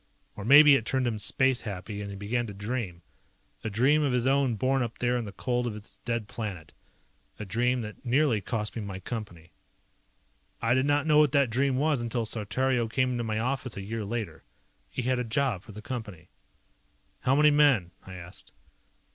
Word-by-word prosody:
Or 105 - -7
maybe 145 +5 +8
it 135 - +3
turned 130 +2 0
him 115 -3 -1
space 130 +4 +1
happy 100 0 -6
and 100 - -5
he 100 - -7
began 115 +5 -2
to 100 - -8
dream. 100 -4 -4 0.6
A 110 - -2
dream 130 +9 +3
of 140 -4 +1
his 125 -1 +1
own 135 -3 +2
born 130 +5 +1
up 115 -1 -3
there 125 0 +1
in 120 -2 -2
the 100 - -7
cold 120 +4 -1
of 110 - -4
his 105 0 -11
dead 115 -3 -2
planet. 100 -6 -6 0.6
A 105 - -6
dream 120 +5 0
that 105 -1 -8
nearly 125 -3 +2
cost 105 +1 -3
me 115 - -3
my 100 -2 -6
Company. 95 -6 -7 1.1
I 115 +1 +2
did 130 +2 +2
not 145 +1 +2
know 150 -1 +5
what 150 -2 +4
that 140 -5 +3
dream 135 +2 +1
was 145 -2 +1
until 120 0 -2
Saltario 120 +3 0
came 130 +3 0
into 120 -1 -2
my 110 -1 -2
office 130 0 -2
a - - -4
year 110 +2 -4
later. 110 +1 -5 0.5
He 130 - -4
had 130 +1 +1
a - - 0
job 120 -3 0
for 110 - -13
the 105 +1 -10
Company. 105 -10 -7 0.9
"How 130 - +2
many 150 +1 +6
men?" 140 -12 +4
I 95 - -10
asked. 90 0 -11
120 Hz, 200 wpm, -28 LUFS, 105-130 Hz, 1.1 s, maybe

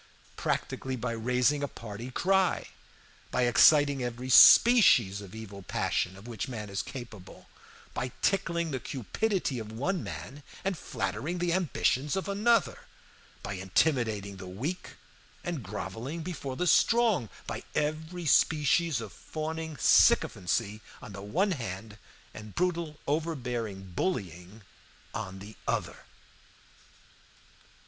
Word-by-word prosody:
Practically, 130 0 -2
by 125 0 -3
raising 125 +5 +1
a 145 - -1
party 115 -1 -8
cry; 190 +7 +1 0.6
by 125 - +1
exciting 140 +3 +5
every 125 +1 -4
species 125 - +7
of 100 0 -11
evil 100 -3 -9
passion 90 0 -1
of 100 +4 -12
which 115 0 -4
man 105 -5 -6
is 100 - -1
capable; 110 -7 -10 0.5
by 125 0 -3
tickling 170 -4 +1
the 130 - -2
cupidity 145 - -2
of 110 -1 -7
one 160 - -2
man 100 - -7 0.2
and 195 -1 0
flattering 170 +2 -3
the 175 -1 0
ambitions 150 -5 +1
of 190 - -2
another; 215 +4 +1 0.6
by 100 - -4
intimidating 100 - 0
the 95 -1 -9
weak, 130 - -5 0.5
and 175 -6 -3
groveling 110 - -5
before 145 -6 -5
the 180 - -1
strong; 220 - +3 0.2
by - - -5
every 160 +4 -2
species 155 -1 +3
of - - -8
fawning 160 0 -5
sycophancy 105 +1 +3 0.2
on 105 - -10
the 100 - -7
one 175 - 0
hand, 110 - -5 0.3
and 105 -1 -10
brutal 170 -4 -1
overbearing 120 - -3
bullying 95 - -4 0.5
on 95 0 -5
the 100 +3 -11
other. - - -2
125 Hz, 125 wpm, -29 LUFS, 105-165 Hz, 0.6 s, species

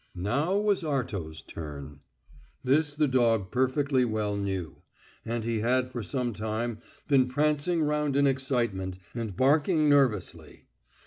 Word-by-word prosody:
Now 140 - 0
was 205 -2 +1
Arto's 100 - -3
turn. 75 -2 -8 0.6
This 145 +3 +2
the 150 0 +2
dog 115 -7 +2
perfectly 130 +1 +1
well 110 -3 -1
knew, 95 -6 -3 0.5
and 115 0 -3
he 115 -1 -1
had 125 +3 +1
for 120 - -4
some 125 +2 -2
time 110 +2 -3 0.3
been 135 -3 +4
prancing 150 +5 +1
round 150 -1 0
in 140 0 +4
excitement, 120 -9 -1 0.2
and 110 -6 -5
barking 150 +4 +3
nervously. 135 -8 +1
125 Hz, 130 wpm, -28 LUFS, 105-145 Hz, 0.6 s, been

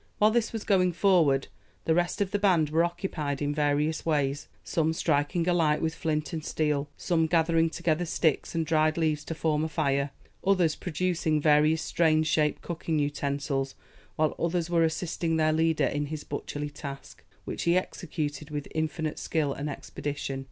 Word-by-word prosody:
While 215 +1 +5
this 230 0 +1
was 225 -2 -4
going 185 -4 +3
forward 165 -8 +3 0.4
the 160 - +3
rest 175 +3 0
of 195 -1 0
the 205 - 0
band 175 -7 +3
were 165 +2 +3
occupied 170 -5 -2
in 145 0 -1
various 150 +1 +1
ways 145 -3 0 0.2
some 160 -1 0
striking 160 +2 0
a 180 - +3
light 155 -3 +2
with 160 0 -1
flint 155 0 -2
and 160 -2 -3
steel 150 -2 -1
some 165 -3 +1
gathering 165 0 +3
together 170 +1 0
sticks 160 0 0
and 165 -1 0
dried 155 0 +2
leaves 155 -2 0
to 165 - -4
form 155 -1 0
a 160 - -1
fire 140 -3 0 0.3
others 185 -5 +3
producing 170 -2 0
various 150 +1 +4
strange 155 -2 +2
shaped 150 -1 +1
cooking 165 -2 -2
utensils 140 -2 -1 0.4
while 155 -1 +1
others 170 0 -1
were 170 -1 +3
assisting 165 0 -1
their 155 0 +3
leader 160 -2 +2
in 145 +2 -1
his 155 0 -5
butcherly 145 0 -5
task, 140 -2 -9 0.2
which - - -4
he 170 +1 +4
executed 150 -5 -4
with 145 -1 -4
infinite 155 0 -2
skill 150 -4 0
and 145 +2 -4
expedition. 145 -1 -5
155 Hz, 175 wpm, -28 LUFS, 150-170 Hz, 0.4 s, While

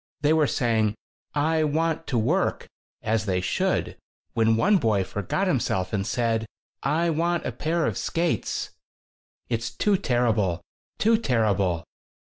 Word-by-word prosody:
They 150 +1 +4
were 155 -2 +3
saying 110 -5 +1 0.4
'I 155 +2 +2
want 160 +2 0
to 125 - 0
work' 160 - +1 0.4
as 110 0 0
they 90 -1 +1
should 90 0 -1 0.4
when 115 0 +3
one 200 - +4
boy 110 - +2
forgot 105 - -2
himself 105 - 0
and 100 -1 -1
said: 115 -2 0 0.3
'I 165 +4 +1
want 170 +2 0
a - - -1
pair 160 +1 -1
of - - -1
skates!' 170 0 -1 0.8
It's 115 -1 -2
too 200 - +1
terrible! 115 - +1 0.4
too 225 +1 +3
terrible!" 100 - +1
120 Hz, 135 wpm, -25 LUFS, 110-160 Hz, 0.8 s, They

